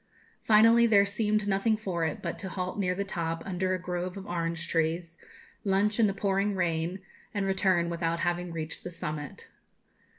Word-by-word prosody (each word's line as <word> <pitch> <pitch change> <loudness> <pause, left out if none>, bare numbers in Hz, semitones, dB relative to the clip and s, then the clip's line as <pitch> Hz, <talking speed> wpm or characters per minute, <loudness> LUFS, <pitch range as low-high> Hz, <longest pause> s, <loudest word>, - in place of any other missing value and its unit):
Finally, 230 +2 +6
there 200 -3 +5
seemed 210 0 0
nothing 205 +3 +2
for 185 -6 -2
it 160 - -2
but 170 - -3
to 190 - -5
halt 185 +2 -4
near 180 -2 +1
the 200 - -1
top, 165 -4 -3
under 185 0 0
a - - -4
grove 180 +1 -4
of 195 - -7
orange 170 -2 -2
trees, 165 +1 -1 0.5
lunch 205 +2 +1
in 220 - +6
the - - +1
pouring 200 +1 +1
rain, 170 0 -1 0.4
and 200 -1 0
return 190 -3 +2
without 170 0 -1
having 175 0 -1
reached 160 -1 -5
the - - -5
summit. 155 -4 -6
185 Hz, 175 wpm, -29 LUFS, 170-200 Hz, 0.5 s, Finally